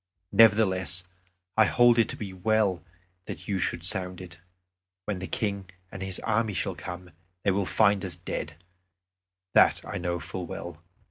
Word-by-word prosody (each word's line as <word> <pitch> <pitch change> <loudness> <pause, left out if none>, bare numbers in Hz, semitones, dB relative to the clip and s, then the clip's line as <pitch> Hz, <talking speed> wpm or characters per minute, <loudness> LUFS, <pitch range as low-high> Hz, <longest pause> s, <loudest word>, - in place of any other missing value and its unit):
Nevertheless, 95 -5 +4 0.5
I 110 - +6
hold 120 0 +5
it 115 - +3
to - - -3
be 100 -3 -6
well 100 -1 +1 0.4
that - - -7
you 100 -3 0
should 85 - -1
sound 90 +1 -1
it. 90 -2 -10 0.7
When 105 -3 -3
the 95 - -5
King 100 -3 -3 0.2
and 95 - -8
his 95 -1 -2
army 110 -1 0
shall 90 - -1
come, 90 0 -8 0.3
they 100 - +3
will 95 0 0
find 100 -2 +3
us 90 -4 -3
dead 80 -2 -5 1.0
that - - +5
I - - -4
know 85 0 -2
full 90 +1 -6
well. 85 -1 -7
95 Hz, 160 wpm, -27 LUFS, 90-105 Hz, 1.0 s, I